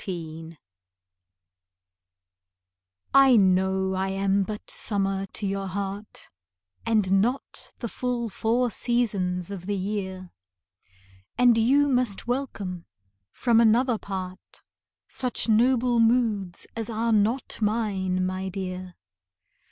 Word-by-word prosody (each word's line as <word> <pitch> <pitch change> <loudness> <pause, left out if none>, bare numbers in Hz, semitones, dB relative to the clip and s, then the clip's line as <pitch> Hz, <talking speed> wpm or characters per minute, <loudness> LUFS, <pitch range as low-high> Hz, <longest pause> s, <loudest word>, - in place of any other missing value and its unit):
III 165 -2 -6 2.6
I 270 -2 +7
know 190 0 +2
I 190 +1 -1
am 195 +1 +1
but 210 +2 -4
summer 195 -2 -1
to 205 - -5
your 195 0 -2
heart, 200 +2 -6 0.6
And 195 -4 +3
not 245 +6 -3
the 235 - -4
full 245 0 -2
four 230 +3 0
seasons 200 -8 -1
of 185 -2 -7
the 205 - 0
year; 190 -2 -4 1.1
And 245 -1 +5
you 270 +6 +4
must 250 -7 0
welcome 215 -9 -4 0.4
from 235 -2 +3
another 235 +1 +3
part 185 -1 -7 0.4
Such 250 -2 -1
noble 240 +2 +3
moods 225 -6 +1
as 225 0 -4
are 225 +1 0
not 220 +5 0
mine, 195 -4 0
my 185 +1 -3
dear. 185 -1 -6
205 Hz, 105 wpm, -25 LUFS, 190-235 Hz, 2.6 s, I